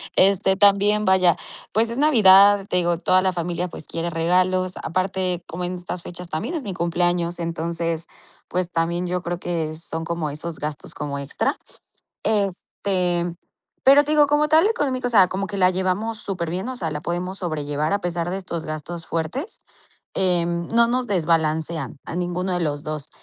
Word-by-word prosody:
Este, 190 0 +4
también, 205 +1 +4
vaya, 185 -3 +4 0.4
pues, 225 +2 +2
es 235 - -4
Navidad, 205 -8 +6
te - - +2
digo, 175 -1 +1
toda 185 0 +3
la 185 0 +1
familia, 175 0 -2
pues, 165 - -8
quiere 165 +1 -3
regalos. 185 +2 +1
Aparte, 185 0 -1
como 180 +2 -4
en 180 - -3
estas 180 0 -6
fechas 175 0 -8
también 220 - -3
es 305 - -3
mi 200 -4 -4
cumpleaños, 175 0 0
entonces, 165 0 -2 0.4
pues, 180 0 -2
también 170 +2 0
yo 180 0 -2
creo 175 0 -3
que 165 -3 -3
son 165 0 -5
como 165 -2 -2
esos 155 +2 -6
gastos 150 0 -5
como 140 -1 -4
extra. 140 0 -1 0.7
Este, 185 -4 -1 0.5
pero, 280 +2 +7
te 300 - -1
digo, 295 -1 +5
como 295 +1 +2
tal, 320 +6 +5
económica, 260 - -1
o - - -5
sea, 195 -5 +6
como 195 +1 -2
que 200 +1 -5
la 185 -1 +5
llevamos 190 +5 -1
superbién. 185 0 -3
O 260 - -6
sea, 165 -9 -3
la 150 0 -5
podemos 180 +3 -3
sobrellevar 150 -2 -2
a 205 - +1
pesar 175 -1 -2
de 190 - -2
estos 170 -4 -5
gastos 160 +2 -6
fuertes. 165 - -4 0.5
Em, 170 -2 +1
no 235 0 +4
nos 250 +1 0
desbalancean 160 - 0
a - - -6
ninguno 180 +1 -2
de 175 - -1
los 145 -3 -2
2. 155 -1 -5
180 Hz, 180 wpm, -23 LUFS, 165-195 Hz, 0.7 s, pero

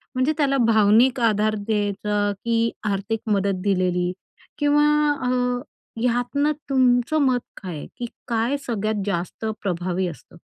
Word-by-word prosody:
म्हणजे 255 +4 +2
त्याला 275 -2 +2
भावनिक 225 +4 +4
आधार 215 -1 +2
द्यायचा 205 0 -1
की 230 0 +1 0.2
आर्थिक 200 +3 -2
मदत 195 -2 +1
दिलेली 180 -2 +1 0.5
किंवा 295 0 +3 0.4
अ, 250 - 0 0.7
ह्यातनं 250 +5 +1 0.2
तुमचं 255 +2 +3
मत 255 -2 +2 0.2
काय 180 -3 -5
आहे - - -7
की 245 - -3 0.2
काय 235 +4 0
सगळ्यात 215 -3 -1
जास्त 185 +2 -3 0.2
प्रभावी 180 -1 -1
असतं? 170 +1 -10
215 Hz, 125 wpm, -23 LUFS, 200-245 Hz, 0.7 s, भावनिक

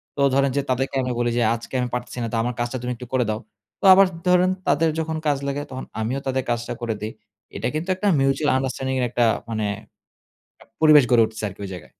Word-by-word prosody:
তো 140 - -2
ধরেন 140 -1 +3
যে - - +3
তাদেরকে 135 +1 -1
আমি 125 - -2
বলি 120 0 +1
যে, - - +2
"আজকে 115 +3 -10
আমি 125 -1 -1
পারতেছি 125 0 -4
না - - -1
তো - - +1
আমার 120 +1 -2
কাজটা 120 +2 -2
তুমি 125 - -3
একটু 125 0 -10
করে 125 -2 +2
দাও।" 110 0 -1 0.4
তো - - -2
আবার 195 +1 +7 0.2
ধরেন 180 0 +4 0.2
তাদের 160 +2 +3
যখন 160 0 -2
কাজ 145 -2 +2
লাগে 140 +1 -2
তখন 130 - -6 0.2
আমিও 125 +5 -1
তাদের 130 -1 0
কাজটা 120 0 -2
করে 115 -2 -1
দেই। 110 - -4 0.4
এটা - - -2
কিন্তু 160 +4 -3
একটা 205 +2 -2
মিউচুয়াল 135 +2 +2
আন্ডারস্ট্যান্ডিং 130 0 -2
এর 125 - +1
একটা 120 0 +2 0.2
মানে 110 -2 -1 1.2
পরিবেশ 150 -3 +7
গড়ে 120 -2 +6
উঠছে 110 0 -9
আরকি 100 +1 -13
ঐ - - -3
জায়গায়। 90 - -10
130 Hz, 225 wpm, -23 LUFS, 120-145 Hz, 1.2 s, আবার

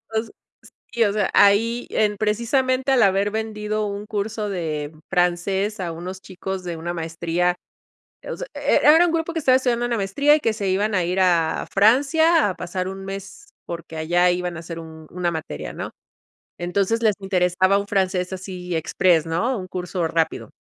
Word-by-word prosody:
O 220 - +4
s 225 - -5
s - - -16 0.6
sí, 235 - +3
o 200 - +1
sea, 210 -2 0
ahí 225 +4 +4
en 210 -1 +1
precisamente 255 +5 +1
al 255 -4 +5
haber 195 +1 +2
vendido 215 -1 -2
un 200 +1 -5
curso 210 0 -3
de 155 -5 -3 0.2
francés 190 +3 0
a 175 -2 -3
unos 185 +3 -7
chicos 190 0 -6
de 175 -2 -5
una 175 +2 -4
maestría. 170 +2 -1 0.7
O - - -4
sea, - - -6
e - - +1
era 320 +4 +7
un - - 0
grupo 330 0 -1
que 330 - -1
estaba 260 -4 +4
estudiando 240 -2 +1
una 235 -1 -1
maestría 280 +10 +3
y - - 0
que 225 -6 0
se 200 -3 -2
iban 205 +3 +1
a 185 - +2
ir 180 +2 -1
a 170 -3 +2
Francia 285 +7 +4
a 185 - -4
pasar 180 +1 -4
un 195 0 -7
mes 195 - -8 0.2
porque 170 -1 -7
allá 175 +3 +2
iban 180 -1 -2
a - - -6
hacer 165 0 -7
un 160 -1 -11
una 175 -1 -1
materia, 155 - -5
¿no?, - - -6 0.7
entonces 195 +6 0
les 215 -3 +3
interesaba 185 0 +2
un 200 - -5
francés 185 -2 0
así 180 -2 -5
express, 165 0 +2
¿no?, 225 +10 0
un 185 - -7
curso 180 -1 -3
rápido. 165 0 -1
195 Hz, 190 wpm, -22 LUFS, 175-220 Hz, 0.7 s, era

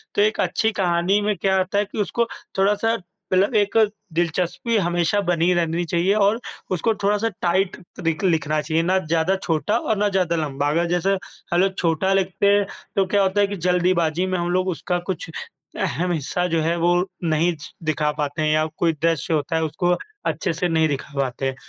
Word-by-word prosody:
तो 205 - +3
एक 215 +1 +2
अच्छी 220 0 +1
कहानी 180 0 +1
में 210 0 0
क्या 190 -1 +1
होता 185 +2 0
है 205 - +2
कि 210 - -7
उसको 235 +3 0 0.3
थोड़ा-सा 210 +4 +2 0.4
मतलब 195 +5 +3
एक 205 0 +2 0.4
दिलचस्पी 175 - -1
हमेशा 175 +1 +1
बनी 175 +1 +3
रहनी 170 0 0
चाहिए 175 +4 +1
और 210 +2 +3 0.3
उसको 185 +5 +1
थोड़ा-सा 210 +2 +2
टाइट 185 +2 +1 0.3
रिक 165 +3 0
लिखना 155 -4 +1
चाहिए, 160 +2 0
ना 185 +2 +2
ज़्यादा 165 +2 +1
छोटा 170 +7 +1
और 220 -2 -1
ना 205 0 +2
ज़्यादा 180 -3 +1
लंबा। 145 -2 -1
अगर 165 +3 +1
जैसे 180 +3 +1 0.4
अगर 185 +3 +4
छोटा 170 +3 +1
लिखते 195 +1 +1
हैं 200 0 +4 0.3
तो 195 - +3
क्या 200 +2 +2
होता 190 +2 +2
है 200 - +3
कि 200 - -4
जल्दीबाजी 180 -1 +2
में 185 -1 -1
हम 175 0 -1
लोग 185 +1 +1
उसका 180 0 -2
कुछ 185 -2 -3 0.5
अहम 180 +1 -1
हिस्सा 170 +3 -1
जो 165 -2 0
है 165 +2 +1
वो 175 +1 +3 0.3
नहीं 165 +2 +2 0.3
दिखा 155 -1 0
पाते 145 +2 -2
हैं 155 0 +2
या 155 0 +2
कोई 165 -2 +2
दृश्य 165 -2 +1
होता 155 +2 0
है 160 - +1
उसको 175 +3 +1 0.3
अच्छे 160 +1 -1
से 175 +3 -1
नहीं 160 -1 +3
दिखा 145 +1 -4
पाते 135 0 -2
हैं, 135 - -3
175 Hz, 195 wpm, -22 LUFS, 160-195 Hz, 0.5 s, अगर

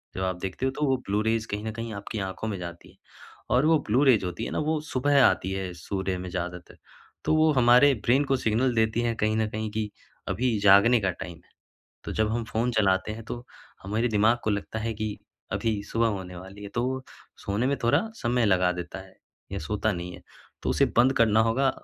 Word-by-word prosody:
जब 95 - -2
आप 95 -1 -1
देखते 95 +7 -3
हो - - 0
तो 150 +2 -1
वह 130 - +3
ब्लू-रेज़ 110 +2 0
कहीं 105 +1 -3
न 110 - -2
कहीं 115 0 -5
आपकी 100 +1 -5
आँखों 95 +3 -4
में 100 -3 -3
जाती 85 -1 -8
हैं - - -26 0.6
और 130 - +4
वो 160 0 +5
ब्लू-रेज़ 125 -2 +4
होती 90 -1 -4
है - - -5
न - - -2
वो 155 0 +1
सुबह 140 -2 +2
आती 95 - +2
है 95 -1 -3
सूर्य 95 +2 -3
में 90 0 -6
ज़्यादातर। 90 0 -6 0.5
तो 155 - +3
वो 155 0 +4
हमारे 125 +2 +6
ब्रेन 135 +5 +4
को 135 0 +1
सिग्नल 120 +2 +1
देती 110 +1 +2
है 120 -1 0
कहीं 110 0 0
न 110 -1 +1
कहीं 110 0 -3
कि 110 -1 -2 0.4
अभी 115 +3 0
जागने 100 +4 +6
का 95 - +1
टाइम 85 -1 -8
है। - - -30 0.5
तो - - -4
जब 110 0 +1
हम 115 -1 -1
फ़ोन 115 +2 -1
चलाते 100 -1 +2
हैं 110 0 -8
तो, 120 +1 -7 0.4
हमारे 110 +5 0
दिमाग 110 +2 +3
को 110 - +1
लगता 105 +2 -3
है 115 +1 -2
कि 105 -1 -3 0.4
अभी 110 -3 -1
सुबह 115 0 +2
होने 95 -3 -5
वाली 95 +3 -10
है, 100 - -6
तो 120 +4 -2
वो 130 0 -2 0.4
सोने 105 +6 0
में 140 - +1
थोड़ा 120 - +4 0.2
समय 120 -1 +1
लगा 90 -2 +3
देता 90 0 -6
है 95 0 -15 0.4
या - - -2
सोता 105 +5 -1
नहीं 90 0 -5
है। - - -12 0.4
तो - - 0
उसे - - +3
बंद 130 +2 +6
करना 110 -1 +4
होगा 125 +4 +2
110 Hz, 225 wpm, -26 LUFS, 95-120 Hz, 0.6 s, हमारे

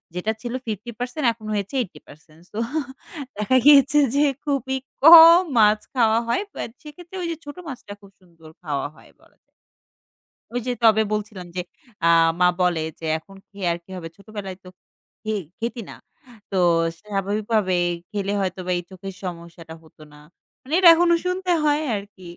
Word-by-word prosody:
যেটা 210 +5 -1
ছিল 240 0 -5
50% 240 - -5
এখন 220 -1 -15
হয়েছে 205 +5 -3
80%। 160 -5 -12
সো 220 - -4 0.8
দেখা 235 +5 +2
গিয়েছে 290 0 +7 0.2
যে 295 +1 +4 0.2
খুবই 265 -2 -1 0.3
কম 335 +2 +10 0.2
মাছ 210 -1 +5
খাওয়া 225 -3 +3
হয়। 235 +11 0 0.2
বাট - - -2 0.2
সেক্ষেত্রে 345 +5 -12
ওই 340 - -3
যে - - -3
ছোট 290 - -8
মাছটা 245 -7 -8
খুব 200 0 -17
সুন্দর 165 -3 -18
খাওয়া 145 -3 -2
হয় - - -19
বলা - - -26
যায়। - - -52 1.0
ওই 245 - -2
যে - - +1
তবে 220 -1 +5
বলছিলাম 210 -4 -4
যে, 180 - -1 0.4
আ - - +4 0.3
মা 180 - +5
বলে 180 -2 +2 0.2
যে 165 - -7
"এখন 195 +5 -15
খেয়ে 200 -2 -7
আর 170 - -2
কি - - -31
হবে? 165 -2 -7
ছোটবেলায় 200 -2 -8
তো - - -15 0.6
খে 220 - -3 0.3
খেতি 235 +1 -4
না। - - -8 0.6
তো 195 - -5 0.4
স্বাভাবিকভাবে 205 0 -1 0.4
খেলে 200 -1 -3
হয়তো 185 0 -3
বা - - -1
এই 175 - -5
চোখের 190 +1 -8
সমস্যাটা 170 -2 -8
হত 160 - -22
না।" 150 - -16 0.5
মানে 280 +5 -8
এটা 350 -3 +8
এখনো 340 0 +3
শুনতে 365 0 -1
হয় 300 0 +2
আরকি। 200 -2 -9
210 Hz, 165 wpm, -22 LUFS, 185-265 Hz, 1.0 s, কম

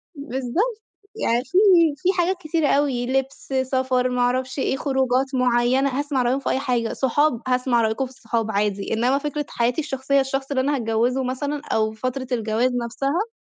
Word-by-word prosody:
بالضبط، 285 - -2 0.3
يعني 240 - 0
في 360 - -1 0.4
في 355 +5 0
حاجات 360 +1 +1
كتيرة 315 -2 0
أوي، 275 -4 +1
لِبس، 270 +1 -2
سفر، 260 -1 0
ما 250 - -2
أعرَفش 255 +2 0
إيه، 265 - 0
خروجات 265 0 0
معيّنة، 250 +2 +2
هاسمَع 285 -3 0
رأيهم 255 +3 +1
في - - -3
أي 265 - +1
حاجة، 245 -4 -1
صحاب، 265 -1 +1
هاسمَع 250 -2 +2
رأيكم 220 +4 0
في 255 - -11
الصحاب 225 -3 -3
عادي، 200 0 -1
إنما 245 +5 +2
فكرة 295 0 -3
حياتي 240 +6 0
الشخصية، 275 -1 0
الشخص 270 +1 -3
اللي 260 - +1
أنا 285 +2 +1
هاتجوّزه 240 +2 0
مثلًا 285 +3 -3
أو 220 0 +1
فترة 255 +4 -4
الجواز 230 +2 +1
نفْسها 280 - -2
260 Hz, 170 wpm, -22 LUFS, 245-280 Hz, 0.4 s, معيّنة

